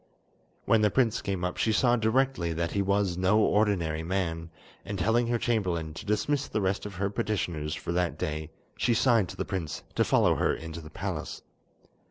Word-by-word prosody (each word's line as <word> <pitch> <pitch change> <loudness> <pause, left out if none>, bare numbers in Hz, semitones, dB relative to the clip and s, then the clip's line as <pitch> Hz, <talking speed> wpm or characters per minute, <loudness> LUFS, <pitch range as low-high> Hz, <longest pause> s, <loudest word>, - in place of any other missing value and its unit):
When 115 -1 +4
the 105 - +4
prince 115 -1 +1
came 95 -3 -3
up 90 - -3
she 110 - +2
saw 120 +3 +3
directly 115 -6 +1
that 85 +1 -2
he 100 - 0
was 100 -2 +1
no 95 +3 +3
ordinary 100 -8 +2
man, 85 -2 -2 0.3
and 100 0 -5
telling 115 +6 +2
her 120 0 +1
chamberlain 90 -10 -1
to 80 - -9
dismiss 130 +7 0
the - - -2
rest 95 +1 -1
of 100 - -9
her 100 +2 -1
petitioners 85 -8 -2
for - - -5
that 90 0 0
day, 75 -3 -3 0.3
she 120 - +1
signed 115 -7 +3
to - - -9
the - - -2
prince 85 -6 -4
to - - +2
follow - - +3
her - - +1
into 80 0 -7
the 75 - -11
palace. - - -5
100 Hz, 195 wpm, -28 LUFS, 85-110 Hz, 0.3 s, When